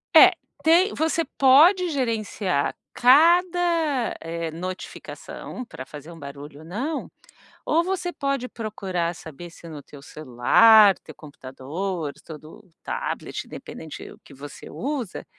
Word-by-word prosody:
É 370 Hz, +4 st, +10 dB, 0.3 s
tem 345 Hz, +6 st, +4 dB
você 320 Hz, +1 st, 0 dB
pode 330 Hz, +8 st, +6 dB
gerenciar 215 Hz, -, -1 dB, 0.2 s
cada, 335 Hz, 0 st, +3 dB
eh, 165 Hz, 0 st, -5 dB
notificação 185 Hz, +7 st, -8 dB
para 130 Hz, -, -10 dB
fazer 150 Hz, +3 st, -11 dB
um 165 Hz, -, -12 dB
barulho 140 Hz, 0 st, -10 dB
ou 160 Hz, -, -14 dB
não, 260 Hz, -, -4 dB, 0.6 s
ou 325 Hz, +2 st, +2 dB
você 360 Hz, -1 st, -3 dB
pode 275 Hz, -3 st, -2 dB
procurar 190 Hz, -7 st, -3 dB
saber 165 Hz, +3 st, -10 dB
se 170 Hz, -, -14 dB
no 150 Hz, -3 st, -8 dB
teu 140 Hz, 0 st, -14 dB
celular, 185 Hz, -, +5 dB
teu 155 Hz, -, -13 dB
computador, 150 Hz, +3 st, -6 dB
todo 160 Hz, +6 st, -12 dB
tablet, -, -, -4 dB
independente 160 Hz, -2 st, -9 dB
do -, -, -14 dB
que -, -, -16 dB
você 140 Hz, +1 st, -11 dB
usa, 260 Hz, -7 st, -5 dB
200 Hz, 125 wpm, -24 LUFS, -, 0.6 s, É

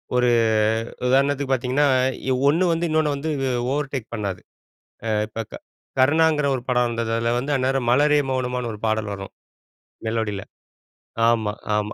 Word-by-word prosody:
ஒரு 125 Hz, 0 st, +3 dB, 0.8 s
உதாரணத்துக்கு 140 Hz, +1 st, +2 dB
பாத்தீங்கன்னா, 130 Hz, +3 st, +1 dB, 0.6 s
ஒண்ணு 160 Hz, +6 st, +3 dB
வந்து 165 Hz, +1 st, 0 dB
இன்னொன்னு 155 Hz, -2 st, +1 dB
வந்து 145 Hz, +3 st, -4 dB, 0.4 s
ஓவர் 140 Hz, -1 st, -2 dB
டேக் 125 Hz, -4 st, -4 dB
பண்ணாது. 100 Hz, -4 st, -4 dB, 0.7 s
ஆ -, -, -1 dB, 0.2 s
இப்ப 115 Hz, +1 st, -5 dB
க -, -, -11 dB, 0.4 s
கருணாங்கிற 150 Hz, +2 st, +3 dB
ஒரு 130 Hz, -, -3 dB
படம் 125 Hz, -1 st, +2 dB
வந்தது. 115 Hz, -1 st, -2 dB
அதுல 115 Hz, +1 st, 0 dB
வந்து 140 Hz, +4 st, -1 dB
அந்நேரம் 130 Hz, -1 st, 0 dB
"மலரே 145 Hz, +3 st, +4 dB
மௌனமான்னு" 125 Hz, -2 st, -2 dB
ஒரு 105 Hz, -, -9 dB
பாடல் 110 Hz, -1 st, -1 dB
வரும். 95 Hz, 0 st, -8 dB, 0.7 s
மெலோடில 110 Hz, -3 st, -2 dB, 0.9 s
ஆமா, 110 Hz, -3 st, +1 dB, 0.2 s
ஆமா. 105 Hz, 0 st, -2 dB
125 Hz, 140 wpm, -23 LUFS, 115-145 Hz, 0.9 s, மலரே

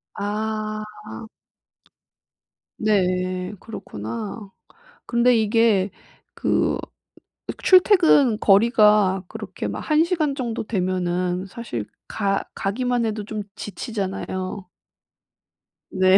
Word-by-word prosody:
아. 215 Hz, +1 st, -2 dB, 2.0 s
네. 185 Hz, -2 st, 0 dB
그렇구나. 195 Hz, -, -7 dB, 0.6 s
근데 240 Hz, +1 st, +3 dB
이게 220 Hz, -3 st, +3 dB, 0.4 s
그 -, -, +1 dB, 0.9 s
출퇴근 345 Hz, -, +5 dB
거리가 210 Hz, -2 st, +4 dB
그렇게 -, -, -6 dB
막 -, -, -4 dB
1 310 Hz, +1 st, +3 dB
시간 315 Hz, -5 st, 0 dB
정도 235 Hz, -5 st, -3 dB
되면은 180 Hz, -2 st, -1 dB
사실 190 Hz, -, -5 dB, 0.2 s
가 200 Hz, -2 st, 0 dB
가기만 240 Hz, +3 st, 0 dB
해도 215 Hz, -1 st, -3 dB
좀 215 Hz, 0 st, -4 dB
지치잖아요. 190 Hz, -3 st, -4 dB, 1.2 s
네. 185 Hz, 0 st, +5 dB
210 Hz, 160 characters per minute, -23 LUFS, 185-230 Hz, 2.0 s, 출퇴근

